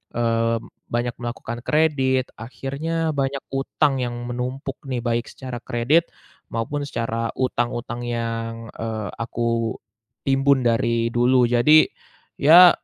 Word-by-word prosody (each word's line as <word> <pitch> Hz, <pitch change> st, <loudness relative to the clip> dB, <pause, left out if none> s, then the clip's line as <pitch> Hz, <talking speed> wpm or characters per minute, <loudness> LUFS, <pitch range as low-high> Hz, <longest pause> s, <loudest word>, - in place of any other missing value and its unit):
eee, 115 Hz, -1 st, +1 dB, 0.3 s
banyak 120 Hz, 0 st, -1 dB
melakukan 120 Hz, 0 st, -5 dB
kredit, 135 Hz, -4 st, +2 dB
akhirnya 150 Hz, +7 st, -3 dB
banyak 135 Hz, 0 st, -1 dB
hutang 135 Hz, +1 st, +1 dB
yang 120 Hz, -1 st, -2 dB, 0.2 s
menumpuk 130 Hz, +3 st, -4 dB
nih, 125 Hz, -2 st, -2 dB
baik 120 Hz, 0 st, 0 dB
secara 130 Hz, -2 st, -7 dB
kredit 140 Hz, +8 st, +2 dB, 0.4 s
maupun 140 Hz, +6 st, -2 dB
secara 115 Hz, -2 st, -2 dB
hutang-hutang 120 Hz, -1 st, -2 dB
yang, 115 Hz, -1 st, -3 dB
eee, 110 Hz, -2 st, -4 dB
aku 115 Hz, -1 st, -1 dB, 0.5 s
timbun 135 Hz, 0 st, +4 dB
dari 115 Hz, 0 st, +2 dB
dulu. 125 Hz, +1 st, +4 dB
Jadi, 150 Hz, +6 st, +6 dB, 0.5 s
ya, 175 Hz, +5 st, +9 dB
120 Hz, 110 wpm, -23 LUFS, 115-135 Hz, 0.5 s, ya